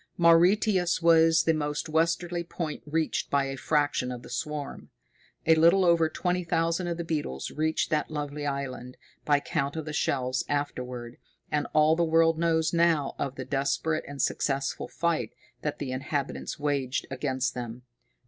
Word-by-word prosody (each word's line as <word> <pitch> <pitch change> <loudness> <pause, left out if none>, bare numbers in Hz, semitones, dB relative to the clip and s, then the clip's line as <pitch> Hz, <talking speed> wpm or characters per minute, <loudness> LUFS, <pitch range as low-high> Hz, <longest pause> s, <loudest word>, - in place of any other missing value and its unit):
Mauritius 175 +2 +4
was 165 -1 +5
the 165 - +3
most 150 -1 -2
westerly 170 +2 0
point 165 -3 -5
reached 160 +1 -1
by 140 -1 +2
a 135 0 -4
fraction 145 -3 0
of 125 -1 -7
the - - -11
swarm. 150 -2 -5 0.6
A 160 - +6
little 170 +4 +5
over 170 -2 +4
twenty 180 +2 -1
thousand 165 +1 0
of 170 -1 -2
the 170 - -3
beetles 150 - -3
reached 160 +1 -1
that 150 -1 0
lovely 145 -1 -4
island, 130 -3 -5 0.3
by 145 -1 +4
count 140 0 -2
of 160 -2 -4
the 155 - -5
shells 130 -3 0
afterward, 125 -4 -3 0.3
and 150 -1 0
all 155 +1 +5
the 170 - +1
world 165 0 +3
knows 165 -1 +1
now 165 -4 +2
of 135 - -2
the - - -6
desperate 145 +3 0
and 145 -1 -8
successful 135 +1 -1
fight 170 -1 -1 0.3
that 150 - -3
the 140 -3 -4
inhabitants 140 +2 -3
waged 140 -3 -1
against 130 -1 -1
them. 120 0 -6
150 Hz, 160 wpm, -27 LUFS, 140-165 Hz, 0.6 s, A